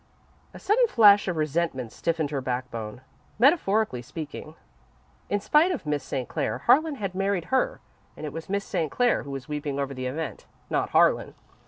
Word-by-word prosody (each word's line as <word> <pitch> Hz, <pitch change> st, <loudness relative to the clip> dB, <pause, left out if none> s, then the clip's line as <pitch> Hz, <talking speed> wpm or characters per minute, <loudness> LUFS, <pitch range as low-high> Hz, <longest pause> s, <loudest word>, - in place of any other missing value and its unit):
A -, -, -11 dB
sudden 475 Hz, +4 st, +3 dB
flash 205 Hz, -, +6 dB
of 180 Hz, -3 st, -1 dB
resentment 155 Hz, -6 st, -1 dB
stiffened 160 Hz, -1 st, -2 dB
her 140 Hz, -2 st, -2 dB
backbone, 125 Hz, -3 st, -4 dB, 0.4 s
metaphorically 220 Hz, -, +3 dB
speaking. 155 Hz, +4 st, -8 dB, 0.7 s
In 205 Hz, -, +1 dB
spite 305 Hz, -, +3 dB
of 310 Hz, -, -4 dB
Miss 150 Hz, -1 st, -1 dB
St. 130 Hz, -2 st, -4 dB
Clair, -, -, -2 dB
Harlan 300 Hz, +5 st, +3 dB
had 195 Hz, -7 st, -4 dB
married 195 Hz, -2 st, -1 dB
her, -, -, +1 dB, 0.4 s
and -, -, -6 dB
it 145 Hz, -, -6 dB
was 165 Hz, +2 st, -7 dB
Miss 200 Hz, 0 st, -1 dB
St. 165 Hz, -5 st, -1 dB
Clair 245 Hz, -1 st, +2 dB
who 140 Hz, -, -10 dB
was 135 Hz, -2 st, -6 dB
weeping 150 Hz, -2 st, -3 dB
over 140 Hz, 0 st, -2 dB
the 130 Hz, -1 st, -4 dB
event, 150 Hz, +3 st, -5 dB, 0.2 s
not -, -, 0 dB
Harlan. -, -, +3 dB
165 Hz, 175 wpm, -26 LUFS, 140-210 Hz, 0.7 s, flash